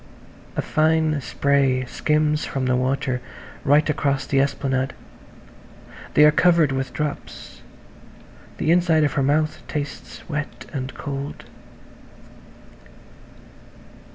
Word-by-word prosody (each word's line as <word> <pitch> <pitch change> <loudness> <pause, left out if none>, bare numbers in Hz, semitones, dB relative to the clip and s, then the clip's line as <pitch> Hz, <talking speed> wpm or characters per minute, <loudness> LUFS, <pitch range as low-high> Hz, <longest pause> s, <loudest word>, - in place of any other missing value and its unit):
A - - -1
fine 155 -1 +2
spray 130 +1 +1
skims 150 +3 0
from 135 -1 -2
the 125 0 +2
water 130 0 -1 0.4
right 145 +3 +4
across 140 -2 0
the 135 0 +1
esplanade. 135 -1 0 1.2
They 150 - +7
are 150 - +7
covered 165 -2 +4
with 135 -1 -2
drops; 150 -1 -6 1.0
the 160 - +1
inside 170 -3 +4
of 145 - +1
her 145 - +1
mouth 150 +3 +1
tastes 145 -3 -6
wet 150 -2 -5
and 130 -2 -4
cold. 140 0 -5
145 Hz, 105 wpm, -22 LUFS, 135-155 Hz, 1.2 s, They